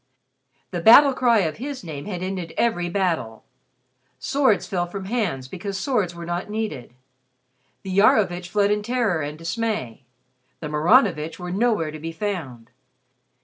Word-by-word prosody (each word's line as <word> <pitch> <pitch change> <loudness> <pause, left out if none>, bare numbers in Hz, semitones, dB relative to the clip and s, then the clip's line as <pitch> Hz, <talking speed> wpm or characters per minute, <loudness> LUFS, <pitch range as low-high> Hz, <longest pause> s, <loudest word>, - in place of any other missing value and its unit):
The 175 - -3
battle 275 +8 +8
cry 240 -4 +3
of 160 -4 -2
his 265 +1 -6
name 150 -4 -7
had 185 -3 -5
ended 185 -3 -5
every 175 -7 +1
battle. 170 - -2 0.7
Swords 270 -7 +1
fell 175 -4 -2
from 190 +2 -7
hands 190 - -2
because 195 +6 -5
swords 195 -6 -1
were 170 0 -7
not 175 +3 -4
needed. 210 - -5 0.9
The 190 -1 -4
Iarovitch 180 -4 +3
fled 205 0 +2
in 210 0 +1
terror 225 -7 0
and 150 +1 -5
dismay; 165 - -3 0.6
the 150 - -5
Maranovitch 165 - +3
were 180 -1 -6
nowhere 205 -6 +1
to 155 - -8
be 165 +2 -5
found. 160 - -5
185 Hz, 145 wpm, -23 LUFS, 165-215 Hz, 0.9 s, battle